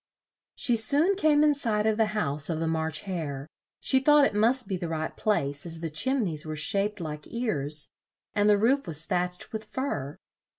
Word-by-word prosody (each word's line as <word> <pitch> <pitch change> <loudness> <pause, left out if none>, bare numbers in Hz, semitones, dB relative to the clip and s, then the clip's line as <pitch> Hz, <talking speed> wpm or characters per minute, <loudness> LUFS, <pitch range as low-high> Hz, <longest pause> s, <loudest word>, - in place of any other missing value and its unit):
She 240 -2 +2
soon 295 - +3
came 305 -5 +3
in 300 -1 +5
sight 220 -7 0
of 220 -1 +2
the 220 -1 +3
house 145 -6 0
of 160 -2 -1
the 165 - -1
March 160 -1 -1
Hare; 155 -8 -5 0.3
she 265 - +2
thought 295 +1 +5
it - - 0
must 230 +3 +2
be 190 - -2
the 175 -1 -4
right 160 -1 -3
place, 145 -9 0
as 165 -1 -7
the 165 -1 -4
chim 255 - 0
neys 155 -4 -4
were 155 0 -5
shaped 200 +6 0
like 150 -3 -6
ears, 155 - -1 0.4
and 205 0 +2
the 205 - +5
roof 250 +4 +2
was 160 0 -1
thatched 180 +1 -2
with 220 0 -4
fur. 145 - -4
195 Hz, 200 wpm, -27 LUFS, 155-235 Hz, 0.4 s, in